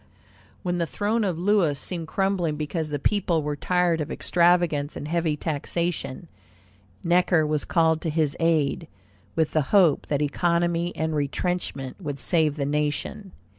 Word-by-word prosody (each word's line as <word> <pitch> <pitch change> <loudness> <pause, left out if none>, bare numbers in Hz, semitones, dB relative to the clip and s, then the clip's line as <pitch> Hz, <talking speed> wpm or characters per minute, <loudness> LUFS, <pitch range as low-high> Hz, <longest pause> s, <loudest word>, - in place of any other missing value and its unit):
When 175 -1 -1
the 170 - 0
throne 210 - 0
of 185 -5 -1
Louis 180 -5 +2
seemed 170 +1 -5
crumbling, 190 -4 0
because 155 +1 -3
the 145 - -2
people 170 0 +1
were 150 0 -2
tired 175 +1 +1
of 150 - -4
extravagance 170 -4 +2
and 145 - -6
heavy 165 -2 0
taxation, 165 +1 -3 0.8
Necker 175 -2 +3
was 150 -1 -1
called 160 -2 +2
to 165 - -2
his 155 -2 0
aid, 160 -4 +1 0.5
with 160 -2 +1
the 155 - +2
hope 180 -8 +4
that 145 0 0
economy 170 +3 0
and 160 0 -1
retrenchment 145 -1 -3
would 145 -4 -4
save 155 0 +1
the 140 -2 -2
nation. 150 +7 -2
165 Hz, 150 wpm, -25 LUFS, 150-175 Hz, 0.8 s, hope